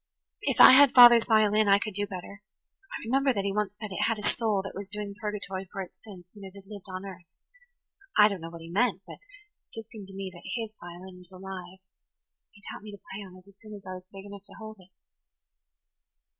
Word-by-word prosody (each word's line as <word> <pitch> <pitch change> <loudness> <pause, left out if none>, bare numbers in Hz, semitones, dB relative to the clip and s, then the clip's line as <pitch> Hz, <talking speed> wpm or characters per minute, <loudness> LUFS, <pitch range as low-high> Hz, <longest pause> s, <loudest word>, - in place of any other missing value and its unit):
If - - -1
I - - +11
had 275 0 +7
father's 240 -2 +9
violin 215 -2 +3
I 200 0 +6
could 215 0 -5
do 205 +1 -2
better. 200 +2 -9 0.5
I - - -6
remember 270 +3 +2
that 200 - -1
he 200 0 -2
once 210 -1 -1
said 215 -2 -7
it 190 - 0
had 225 -1 0
a 210 - -8
soul 210 -3 0
that 195 - -7
was 200 0 -7
doing 210 -1 -5
purgatory 195 -3 -5
for - - -7
its 185 - -9
sins 190 -5 -12
when 205 -2 -13
it 190 0 -11
had 200 -1 -13
lived 205 -1 -11
on 185 +1 -6
earth. 180 -3 -10 0.9
I 210 -1 +8
don't 200 -4 -4
know 165 - -7
what 165 0 -11
he 165 +1 -10
meant, 235 +7 +1
but - - -11
it - - -25
did 225 -1 -9
seem 205 -4 -10
to 195 - -12
me 195 -1 -5
that 180 +7 -6
his 220 -1 -5
violin 180 +1 -11
was 180 0 -18
alive. 185 0 -9 0.7
He 205 -2 -22
taught - - -8
me 210 0 -10
to 205 - -13
play 200 - -6
on 185 -1 -13
it 185 +1 -19
as 200 0 -20
soon 215 -1 -10
as 200 -2 -13
I 185 - -6
was 185 0 -10
big 195 0 -11
enough 200 -1 -10
to - - -13
hold 220 0 -10
it." 185 0 -19
200 Hz, 240 wpm, -28 LUFS, 190-215 Hz, 0.9 s, I